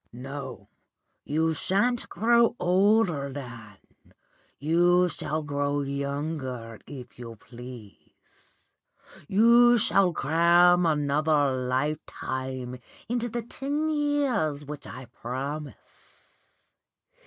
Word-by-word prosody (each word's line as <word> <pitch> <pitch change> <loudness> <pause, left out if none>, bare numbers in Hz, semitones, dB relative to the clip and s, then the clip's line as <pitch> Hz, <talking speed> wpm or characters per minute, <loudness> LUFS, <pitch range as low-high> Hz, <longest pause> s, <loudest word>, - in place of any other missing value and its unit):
No, 135 +1 -8 0.6
you 160 +2 +1
shan't 205 +9 0
grow 235 +4 +3
older, 180 -5 +2
Dan, 115 -7 -9 0.8
you 175 +4 +3
shall 155 -1 -3
grow 145 0 -1
younger 140 -4 -4
if 125 -4 -10
you 115 -2 -8
please. 120 -3 -14 0.6
You 235 +4 +6
shall 195 -4 +3
cram 170 +3 +4
another 150 -2 +2
lifetime 130 -2 -3 0.3
into 240 0 -1
the 235 +1 -4
ten 290 +6 -2
years 275 - 0
which 145 0 -8
I 130 0 -9
promise. 140 +6 -8
150 Hz, 85 wpm, -27 LUFS, 130-190 Hz, 0.8 s, You